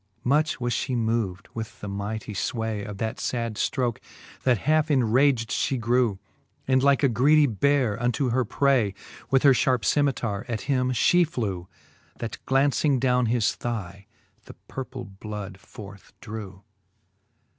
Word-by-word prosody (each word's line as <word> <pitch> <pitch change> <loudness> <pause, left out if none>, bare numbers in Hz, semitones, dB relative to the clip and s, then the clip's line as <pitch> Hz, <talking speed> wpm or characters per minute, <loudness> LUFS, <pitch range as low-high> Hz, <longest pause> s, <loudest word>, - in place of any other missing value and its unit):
Much 150 +3 +1
was 120 -1 -1
flie 130 - -2
moved 110 -5 -1
with 110 -1 -7
the 105 - -7
mightie 105 +2 -4
fway 110 -1 -2
Of 105 -1 -7
that 110 +2 -3
fad 115 -2 -2
ftroke, 120 +1 -1 0.4
that 125 -3 +3
halfe 155 0 +2
enrag'd 125 -2 +3
fhe 135 - 0
grew, 120 -2 +1 0.5
And 130 0 +3
like 140 +1 +3
a - - +6
greedy 145 +5 +4
beare 125 -1 +1
unto 125 +1 0
her 130 +2 +2
pray, 120 -4 +1 0.3
With 135 -1 +3
her 140 -2 +7
fharpe 125 -1 +1
cemitare 120 -8 +1
at 115 -3 -2
him 130 -3 0
fhe 175 +8 +4
flew, 100 - -3 0.5
That 115 -2 -5
glauncing 140 +1 +2
downe 125 -1 +2
his 115 0 +1
thigh, 100 -5 -5 0.4
the - - -12
purple 130 -1 -6
bloud 100 -1 -8
forth 100 0 -12
drew. 100 -3 -8
120 Hz, 145 wpm, -25 LUFS, 105-135 Hz, 0.5 s, her